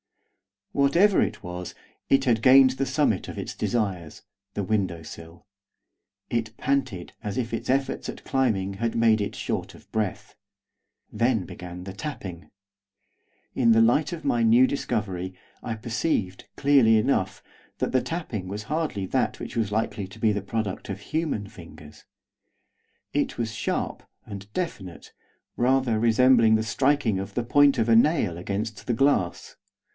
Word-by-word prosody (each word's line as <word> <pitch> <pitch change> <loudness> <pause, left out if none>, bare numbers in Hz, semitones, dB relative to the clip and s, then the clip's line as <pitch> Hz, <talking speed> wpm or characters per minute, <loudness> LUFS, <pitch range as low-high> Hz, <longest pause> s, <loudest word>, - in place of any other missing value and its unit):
Whatever 170 +9 +4
it - - -2
was, 90 0 -6 0.3
it 135 0 +4
had 120 -4 +2
gained 130 +1 +7
the 135 +1 -2
summit 130 - +1
of - - -8
its - - -5
desires, 95 -9 -2 0.3
the 100 - -1
window 95 -5 -1
sill. 80 +3 -11 0.8
It 115 -2 -2
panted 130 -10 -1
as 105 -3 -4
if 120 -2 -2
its 115 - -4
efforts 135 +1 0
at - - -8
climbing 105 -8 0
had 115 +2 -2
made 115 -2 +4
it 100 - -3
short - - -4
of - - -19
breath. 105 -4 -3 0.8
Then 115 -3 +1
began 90 +1 -9
the 95 0 -7
tapping. 95 - -7 1.0
In 115 -3 +4
the 115 - +5
light 135 +6 +3
of 165 - -7
my 120 - +2
new 115 +3 +6
discovery, 95 -9 -3 0.3
I 115 - -4
perceived, 110 - -2
clearly 135 -6 +5
enough, 105 -4 0 0.4
that - - -1
the 130 - +2
tapping 140 - -4
was 100 +3 -5
hardly 150 -8 -2
that - - 0
which - - -7
was 105 -3 0
likely 105 -2 -1
to 95 - -14
be 110 -1 +3
the 105 -1 -1
product 100 0 -4
of 100 0 -5
human 150 -6 -2
fingers, 85 -7 -14 1.1
it - - -1
was 110 -2 -2
sharp - - -2 0.2
and 100 0 -9
definite, 105 - -5 0.5
rather 125 -2 +2
resembling 115 0 +5
the 110 - +1
striking 130 -3 +1
of 95 - -6
the 120 - 0
point 140 +3 +4
of 115 0 +1
a 115 - +6
nail 115 - +3
against 105 +6 -4
the 120 - +1
glass. 115 -9 0
110 Hz, 155 wpm, -25 LUFS, 100-130 Hz, 1.1 s, gained